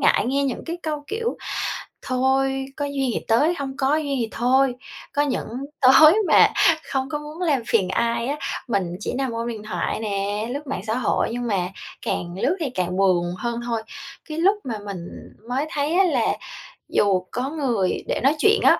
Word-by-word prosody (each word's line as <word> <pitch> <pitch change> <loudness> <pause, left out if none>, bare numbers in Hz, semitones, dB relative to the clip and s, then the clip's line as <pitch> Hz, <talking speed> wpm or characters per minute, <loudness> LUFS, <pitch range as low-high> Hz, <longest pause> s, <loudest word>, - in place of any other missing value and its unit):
ngại - - +4
nghe 275 +2 +1
những 265 -3 -3
cái 335 +1 -3
câu, 300 -2 -3
kiểu: 455 +2 -2 0.7
"Thôi, 265 +1 +1
có 290 - -1
duyên 275 -2 -1
thì - - -1
tới, 290 +10 +4
hông 270 -1 -4
có 275 +3 +2
duyên 285 -3 -1
thì 225 - 0
thôi." 255 +2 +3 0.4
Có 290 - +2
những 285 -3 -1 0.3
tối 270 +5 +8
mà - - +7 0.4
không 265 -1 -1
có 295 - -2
muốn 300 +4 -9
làm 290 -8 +2
phiền 190 -5 +2
ai 235 +3 0
á, 290 +2 -1 0.3
mình 185 -6 -1
chỉ - - -3
nằm 265 -2 -1
ôm 230 +1 -3
điện 220 -3 -5
thoại 215 - -2
nè, 205 +1 -2
lướt 285 +1 -5
mạng 185 - -3
xã 220 - +1
hội, 250 -2 +1
nhưng 245 0 -3
mà 185 -4 0 0.4
càng 175 0 -2
lướt 370 - +2
thì 305 - -1
càng 185 -5 -2
buồn 180 -2 +2
hơn 235 +4 -3
thôi. 230 -2 -2 0.5
Cái 310 - -4
lúc 390 +5 +4
mà 225 -5 -4
mình, 200 -2 -5 0.4
ừm, 230 - -21
mới 270 +4 0
thấy 290 +2 0
á 385 +2 +5
là 360 - +1 0.5
dù 195 -3 +3
có 255 +3 -2
người 245 -12 0
để - - 0
nói 280 +3 +4
chuyện 425 +5 +5
á, - - +6
260 Hz, 200 wpm, -23 LUFS, 220-290 Hz, 0.7 s, tối